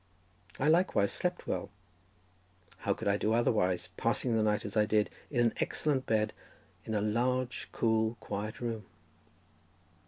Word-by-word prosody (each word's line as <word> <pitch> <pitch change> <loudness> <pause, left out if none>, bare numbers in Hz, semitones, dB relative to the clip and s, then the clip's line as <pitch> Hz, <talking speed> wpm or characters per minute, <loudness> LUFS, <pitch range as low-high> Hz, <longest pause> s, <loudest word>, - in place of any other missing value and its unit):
I 135 - +2
likewise 155 - +3
slept 180 0 -2
well; - - -2 1.1
how - - 0
could - - -5
I 100 0 +3
do 110 +1 +1
otherwise, 90 -6 +2
passing 115 +1 +1
the 110 - +3
night, 105 -1 +1
as 105 - -6
I 105 -1 +4
did, 105 -1 +2 0.2
in 130 - -1
an 115 -1 +3
excellent 140 -4 0
bed 110 -1 +1 0.5
in 110 - -2
a 105 - +1
large, 125 +4 0
cool, 110 0 +1
quiet 105 +1 -4
room? 115 -4 -3
110 Hz, 150 wpm, -32 LUFS, 105-120 Hz, 1.1 s, I